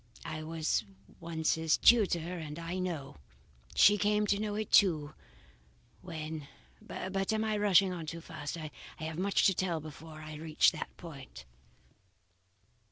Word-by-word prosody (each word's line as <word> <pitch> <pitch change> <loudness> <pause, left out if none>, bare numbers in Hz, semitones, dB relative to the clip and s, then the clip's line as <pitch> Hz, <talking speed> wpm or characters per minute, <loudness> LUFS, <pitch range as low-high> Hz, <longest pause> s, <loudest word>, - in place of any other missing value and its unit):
I 155 - -4
was 160 -5 -1 0.4
once 165 -2 0
his 160 -1 +2
tutor 180 -6 +4
and 150 -1 -6
I 170 +2 -4
know. 160 - -4 0.6
She 205 0 +6
came 210 +1 +2
to 200 0 +1
know 210 -1 -2
it 215 0 -3
too, 155 -7 +4 0.9
when 155 -4 -6 0.3
but 195 +1 -3
I - - +1
am 215 -1 0
rushing 195 -2 +5
on 165 -3 -6
too 170 +2 -5
fast, 155 0 -6
I 155 -2 -6 0.3
have 160 +1 -5
much 200 +1 +2
to 195 - +5
tell 175 -3 -1
before 155 +1 -10
I 155 0 -8
reach 155 0 +3
that - - -5
point. 135 - -10
165 Hz, 150 wpm, -32 LUFS, 155-195 Hz, 0.9 s, She